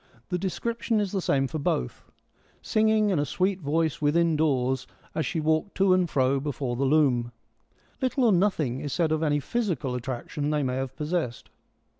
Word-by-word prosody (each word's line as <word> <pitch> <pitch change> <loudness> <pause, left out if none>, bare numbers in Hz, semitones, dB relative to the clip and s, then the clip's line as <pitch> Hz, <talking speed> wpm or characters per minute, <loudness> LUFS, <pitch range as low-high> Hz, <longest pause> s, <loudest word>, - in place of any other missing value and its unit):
The 180 - -1
de 190 +1 -1
scription 230 +5 -1
is 205 -3 -1
the 195 - -1
same 135 -5 +1
for 155 +4 -4
both 65 - -2
— - - -34
■ - - -30 0.5
singing 215 -1 +3
in 175 - +1
a - - +2
sweet 185 +6 0
voice 160 +1 0
within 165 +2 +3
doors 130 -4 +1 0.3
as 160 0 -1
she 165 - -2
walked 160 +5 0
to 195 -1 +4
and 180 -2 +2
fro 135 0 +2
before 135 -3 -3
the 135 +3 0
loom.' 130 -5 +2 0.7
Little 260 0 +1
or 230 - +5
nothing 170 -9 +1
is 145 - -4
said 160 +3 +1
of 155 0 +1
any 145 -2 +2
physical 160 - -2
attraction 130 +4 -3
they 150 -1 +1
may 130 -1 -1
have 135 -1 -4
possessed. 150 -6 -3
155 Hz, 195 wpm, -26 LUFS, 135-185 Hz, 0.7 s, or